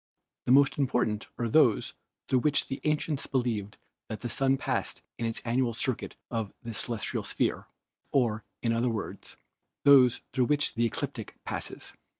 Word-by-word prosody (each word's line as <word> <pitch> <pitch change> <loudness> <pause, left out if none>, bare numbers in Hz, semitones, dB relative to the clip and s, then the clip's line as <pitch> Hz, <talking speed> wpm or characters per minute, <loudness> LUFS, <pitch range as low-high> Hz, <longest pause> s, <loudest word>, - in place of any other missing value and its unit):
The - - +3
most 140 +2 +5
important 120 -5 +1
are 120 - -1
those 115 -3 +4 0.3
through 130 - +3
which 145 +2 +3
the 135 - -5
ancients 150 -1 0
believed 115 -6 -1 0.3
that 110 - -5
the 120 - -3
Sun 135 +2 +2
passed - - -2 0.2
in 115 - 0
its 115 - -2
annual 120 0 0
circuit 130 +1 -2 0.2
of 115 -4 -2
the 115 -1 -5
celestial 110 0 -2
sphere, - - -1 0.4
or, 115 -5 +2 0.2
in 115 -1 +2
other 120 +2 +1
words, 110 -2 -5 0.5
those 130 -4 +7
through 130 - +3
which 145 +2 +2
the 115 0 +2
ecliptic - - -5
passes. - - -5
120 Hz, 155 wpm, -29 LUFS, 115-135 Hz, 0.5 s, those